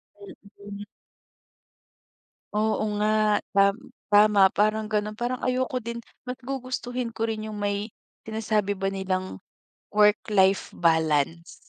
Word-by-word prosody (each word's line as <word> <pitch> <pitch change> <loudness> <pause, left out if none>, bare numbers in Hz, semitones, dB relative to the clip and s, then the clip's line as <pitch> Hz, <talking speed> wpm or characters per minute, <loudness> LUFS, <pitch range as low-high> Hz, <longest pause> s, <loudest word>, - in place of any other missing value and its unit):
Mm. 205 - -11 1.7
Oo 215 0 +1
nga. 215 0 +2
Tam 200 0 +4 0.3
tama 205 -1 +6
parang 215 +1 +1
gano'n. 210 0 -1
Parang 245 +1 -2
ayoko 255 -1 -1
din. 235 +1 -5 0.2
Mas 250 0 -6
gugustuhin 255 -2 -4
ko 225 0 -2
rin 215 -1 -3
yung 210 - -6
may 205 +1 -2 0.3
sinasabi 215 -2 -1
ba 195 -1 -2
nilang 185 - -3 0.6
work-life 205 -2 +3
balance. 160 0 +1
210 Hz, 110 wpm, -26 LUFS, 200-225 Hz, 1.7 s, tama